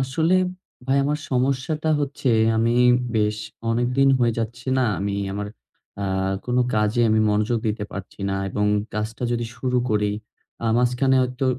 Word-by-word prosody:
আসলে, 160 +7 +1 0.5
ভাই 135 +1 +2
আমার 150 +1 0
সমস্যাটা 135 +5 0
হচ্ছে 140 -2 -2 0.3
আমি 115 +1 +2 0.4
বেশ 105 0 +1 0.3
অনেকদিন 125 +4 +2
হয়ে 120 -2 +2
যাচ্ছে, 120 +3 -4
না! 130 - +3 0.2
আমি 100 0 -1 0.2
আমার 105 +1 -3 0.6
আ - - -1 0.4
কোন 125 0 0 0.2
কাজে 105 +2 +1
আমি 110 0 +3
মনোযোগ 105 +3 +1
দিতে 105 0 -2
পারছি 100 0 -8
না। 95 - -1
এবং 105 +2 0 0.3
কাজটা 110 +3 -4
যদি 120 0 -1
শুরু 125 -1 0
করি 105 -1 +1 0.5
আ - - +1
মাঝখানে 125 +2 +2
হয়তো 125 +1 -2
120 Hz, 150 wpm, -23 LUFS, 105-130 Hz, 0.6 s, না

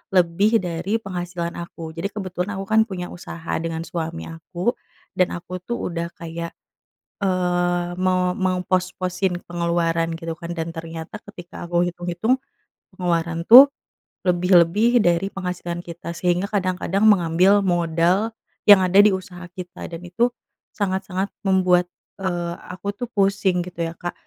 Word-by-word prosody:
lebih 190 +6 +4
dari 180 +4 -1
penghasilan 175 -3 -4
aku. 165 -2 -8
Jadi 170 +4 -2
kebetulan 190 -1 -3
aku 195 - -4
kan 220 0 +4
punya 180 -4 -5
usaha 170 -1 -6
dengan 165 0 -3
suami 165 -1 -4
aku 175 +7 -3 0.4
dan 180 - +2
aku 180 +1 -6
tuh 235 +5 -3
udah 170 0 -3
kayak, 170 0 -6 0.7
eee, 175 -2 +1
mau 185 -1 +2
mengpos-posin 185 0 -1
pengeluaran 170 -1 0
gitu 165 0 -5
kan 170 0 -6
dan 165 0 -3
ternyata 165 +3 -7
ketika 175 -3 -9
aku 175 0 +2
hitung-hitung 175 +8 -1 0.6
pengeluaran 170 -2 -1
tuh 255 +5 +12 0.6
lebih-lebih 180 +6 +4
dari 175 +1 +2
penghasilan 180 -2 -4
kita. 170 0 -7
Sehingga 180 +2 +1
kadang-kadang 190 0 0
mengambil 190 +1 +4
modal 175 +4 +1 0.3
yang 200 -2 +9
ada 185 +2 +3
di 205 - +8
usaha 180 -1 -7
kita 180 0 -8
dan 165 -1 -7
itu 185 +8 +1 0.5
sangat-sangat 190 -1 -2
membuat, 180 -2 +3 0.3
eee, 175 -2 -2 0.2
aku 185 +3 -4
tuh 245 +3 -5
pusing 195 -3 +2
gitu 175 -1 -4
ya, 165 - -7
Kak. 175 - -4
180 Hz, 135 wpm, -22 LUFS, 170-190 Hz, 0.7 s, tuh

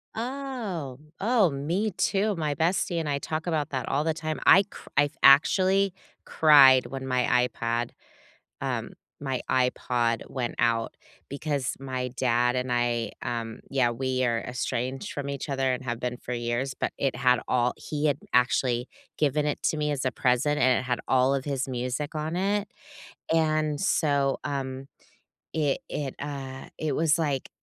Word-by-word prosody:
Oh. 225 - -4 0.2
Oh, 215 -3 +3
me 170 +10 -1
too. 195 +2 0
My 150 -3 -1
bestie 170 +2 0
and 155 -2 -2
I 140 0 0
talk 160 +4 -4
about 155 -3 0
that 130 -3 -3
all 145 +2 +1
the 160 0 +1
time, 155 -1 -4
I 195 +3 +8
cr - - -13
I've 145 +1 +3
actually 185 +7 +5 0.3
cried 135 -5 +7
when 135 -1 -6
my 125 -1 +2
iPad 115 0 -1 0.7
um, - - -2 0.3
my 135 -3 -2
iPod 125 -2 0
went 125 -3 -3
out 115 -1 +1 0.3
because 140 -2 -2
my 130 -2 -3
dad 125 0 +2
and 125 0 -2
I, 120 -1 0
um, 115 -2 -4
yeah, 130 -3 +2
we 130 +1 -1
are 115 -1 +1
estranged 125 +1 -3
from 140 -1 -4
each 140 +2 -4
other 135 -1 +1
and 130 - -4
have 120 -2 -3
been 125 0 -3
for 125 - -6
years, 120 +3 -2
but - - -1
it 135 -3 0
had 125 0 +3
all 125 -1 +2
he 150 0 -3
had 140 -2 +1 0.2
actually 125 0 +2 0.3
given 150 0 +1
it 150 - -2
to 155 - +1
me 150 0 0
as 135 -2 -2
a 130 - +1
present, 130 +4 +1
and 130 -1 +4
it - - -5
had 125 -1 -1
all 130 +1 +3
of 135 - -3
his 135 -2 -2
music 130 +5 -3
on 155 +2 -2
it, 200 +2 0 0.7
and 155 -2 +1
so, 140 -7 +2
um, 135 -1 -4 0.7
it 150 -4 +1
it, 140 -3 -4
uh, 135 -2 -6
it 155 -3 -1
was 160 -1 +3
like 145 -5 -1
135 Hz, 165 wpm, -27 LUFS, 125-155 Hz, 0.7 s, I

